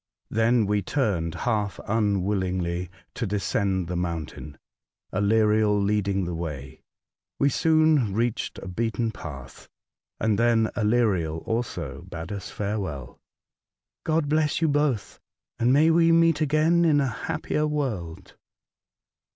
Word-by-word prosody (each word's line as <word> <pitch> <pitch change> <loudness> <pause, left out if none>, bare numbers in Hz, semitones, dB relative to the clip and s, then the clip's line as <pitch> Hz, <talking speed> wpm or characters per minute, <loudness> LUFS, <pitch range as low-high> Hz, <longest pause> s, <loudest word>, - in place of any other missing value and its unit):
Then 115 0 +3
we 105 0 +1
turned 95 - -1
half 105 -4 -1
unwillingly 95 -4 0 0.2
to 120 - -3
descend 100 -2 -1
the 90 - -3
mountain, 80 -4 -4 0.6
Aleriel 105 +1 +3
leading 100 -2 0
the 85 - -3
way. 75 -6 -6 0.6
We 140 - +3
soon 155 -5 +3
reached 115 +3 -1
a - - -8
beaten 115 +4 -1
path, 70 - -10 0.5
and 110 -2 +1
then 115 -2 +3
Aleriel 105 -8 +1
also 90 - -3
bade 85 +2 -7
us 100 -2 -5
fare 105 +1 -3
well: 70 -10 -6 0.4
'' - - -68
God 160 -1 +1
bless 155 0 +1
you 165 - +2
both, 145 -6 0 0.4
and 120 +2 +3
may 155 +4 +5
we 165 0 +4
meet 165 -2 +4
again 155 +3 +3
in 155 -3 +4
a 140 - +2 0.2
happier 155 -1 -1
world." 100 - -4
105 Hz, 125 wpm, -25 LUFS, 90-140 Hz, 0.6 s, may